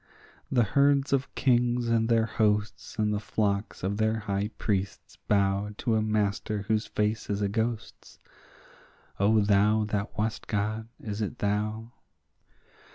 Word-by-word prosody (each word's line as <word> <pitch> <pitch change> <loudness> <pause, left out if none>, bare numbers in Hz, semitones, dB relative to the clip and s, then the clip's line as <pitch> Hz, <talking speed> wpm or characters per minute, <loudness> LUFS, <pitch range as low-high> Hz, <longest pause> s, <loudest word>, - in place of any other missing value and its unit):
The 120 -3 +4
herds 140 +4 +3
of 135 0 -1
kings 120 -2 +2
and 115 -1 +2
their 115 -1 +3
hosts 105 -2 -1
and 105 -1 +1
the 105 - 0
flocks 100 -2 -2
of 100 +2 -1
the 110 +1 +1
high 100 -1 -2
priests 100 -2 -3
bow 100 0 +1
To 115 - 0
a 110 - +2
master 105 -1 -1
whose 110 +1 0
face 105 +1 -1
is 100 0 -1
a 100 - +1
ghost's; 110 +2 -4 1.0
O 105 +2 +4
thou 105 +1 +3
that 105 0 -3
wast 110 +1 -2
God, 110 +2 -2
is 105 -1 -5
it 105 - -3
thou? 110 +3 -2
105 Hz, 145 wpm, -28 LUFS, 100-115 Hz, 1.0 s, The